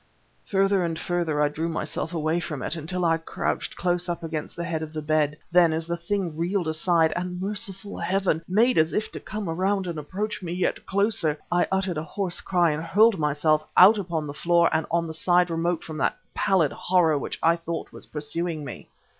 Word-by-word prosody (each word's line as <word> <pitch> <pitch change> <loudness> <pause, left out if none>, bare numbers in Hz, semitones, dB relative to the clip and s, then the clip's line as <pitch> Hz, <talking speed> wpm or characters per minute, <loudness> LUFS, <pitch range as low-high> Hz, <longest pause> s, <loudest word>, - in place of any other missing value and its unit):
Further 195 -1 +2
and 165 -1 -2
further 165 -4 0
I - - +4
drew 160 +3 -3
myself 160 0 -3
away 160 0 0
from 155 -5 -5
it, - - -3
until 175 +3 -2
I 165 -1 +3
crouched 165 - -3
close 175 0 -1
up 170 -1 -3
against 160 -2 -4
the 170 - -4
head 165 -2 -2
of 155 0 -6
the 155 - -3
bed. 150 -1 +1
Then, 175 -1 +5
as 160 +1 -2
the 170 +1 -2
thing 170 -1 -2
reeled 175 +2 -1
aside, 160 0 +2
and 180 0 -3
merciful 200 0 -4
Heaven! 190 -4 0
made 225 +4 +3
as 160 +1 +2
if 215 - -1
to - - -6
come 210 -2 -5
around 190 +4 0
and 170 -3 -4
approach 195 +9 -4
me 175 -2 -4
yet 180 +1 -1
closer, 195 -6 +1
I 175 0 +3
uttered 190 -4 0
a - - -4
hoarse 185 +1 -3
cry 175 -3 +2
and 150 +1 -2
hurled 205 +4 +4
myself 150 +1 +2
out 205 +4 +8
upon 170 -5 -2
the 145 - -6
floor 170 +2 +3
and 160 0 0
on 170 0 +1
the 160 - -5
side 175 +2 +2
remote 165 0 -1
from 155 -1 -7
that - - +1 0.2
pallid 190 -8 +2
horror 175 -4 +2
which - - -4
I 165 +1 +5
thought 165 -1 -5
was - - -11
pursuing 155 +1 -3
me. - - -9
170 Hz, 210 wpm, -25 LUFS, 160-185 Hz, 0.2 s, out